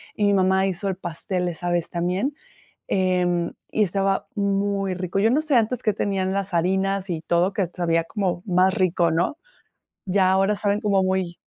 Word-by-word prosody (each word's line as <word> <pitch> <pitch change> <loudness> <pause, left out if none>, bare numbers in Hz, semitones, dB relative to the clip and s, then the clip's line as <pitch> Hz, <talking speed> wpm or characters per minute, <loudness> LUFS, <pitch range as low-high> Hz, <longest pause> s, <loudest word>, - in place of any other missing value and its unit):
Y 205 - +1
mi 200 - +3
mamá 190 0 +3
hizo 190 +2 -3
el 190 - -2
pastel, 180 +1 -3
esa 175 +1 -3
vez 175 -1 0
también. 185 +11 -1 0.5
Em, 180 -2 +1 0.2
y 215 - +1
estaba 195 0 0
muy 200 -1 0
rico. 185 +1 -3
Yo 220 +3 +3
no 295 +5 +2
sé 305 -3 0
antes 235 +2 +1
que 215 - +2
tenían 190 -2 -1
las 195 -2 -2
harinas 190 +2 0
y 160 -2 -2
todo, 175 +4 +1
que 195 -3 0
sabía 165 -1 0
como 180 -2 -2
más 185 +1 +3
rico, 175 -2 +2
¿no? 175 - 0 0.7
Ya 185 -1 +2
ahora 195 +2 +2
saben 205 0 0
como 200 -2 +2
muy 185 -2 -1
190 Hz, 180 wpm, -23 LUFS, 175-200 Hz, 0.7 s, mi